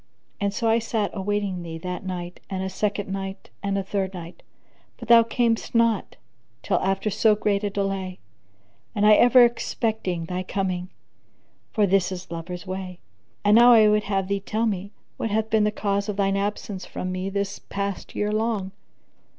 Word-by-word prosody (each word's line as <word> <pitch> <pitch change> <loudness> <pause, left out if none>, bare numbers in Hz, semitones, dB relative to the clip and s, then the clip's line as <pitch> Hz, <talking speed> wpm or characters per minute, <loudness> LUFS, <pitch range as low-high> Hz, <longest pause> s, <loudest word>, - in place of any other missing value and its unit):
So 230 +3 -2
I 225 +1 +4
sat 220 -2 -1
awaiting 200 -2 -2
thee 165 -1 -6
that 180 +3 -5
night 180 -2 -5
and 190 -1 -3
a 190 - -2
second 205 +1 -2
night 195 0 -5
and 200 0 -1
a 195 - -1
third 195 -1 -2
night; 170 0 -9 0.6
but 235 -2 -10
thou 235 -1 +9
camest 230 0 0
not 230 -1 +2 0.5
till - - +1
after 195 +2 0
so 215 +2 +4
great 205 -1 0
delay, 195 -2 -2 0.8
and 205 0 +2
I 215 - +8
ever 245 +3 +7
expecting 220 -7 -2
thy 180 +2 -3
coming; 185 -1 -2 0.8
for 210 - +3
this 195 -1 +2
is 180 -1 -7
lovers' 175 +2 -6
way. 185 -1 -6 0.5
And 205 +1 +6
now 240 +1 +8
I 215 -2 +7
would 210 0 +2
have 195 -2 -1
thee 200 0 0
tell 215 +3 -1
me 200 -2 -2 0.3
what 225 - -2
hath 220 +1 -1
been 220 -1 +4
the 210 - +2
cause 200 -1 -1
of 210 - -2
thine 195 -1 +2
absence 200 -1 -3
from 185 - -5
me 185 +1 -3
the 200 0 -3
past 200 -1 -4
year 210 0 0
long?" 215 -3 -1
200 Hz, 175 wpm, -24 LUFS, 185-215 Hz, 0.8 s, thou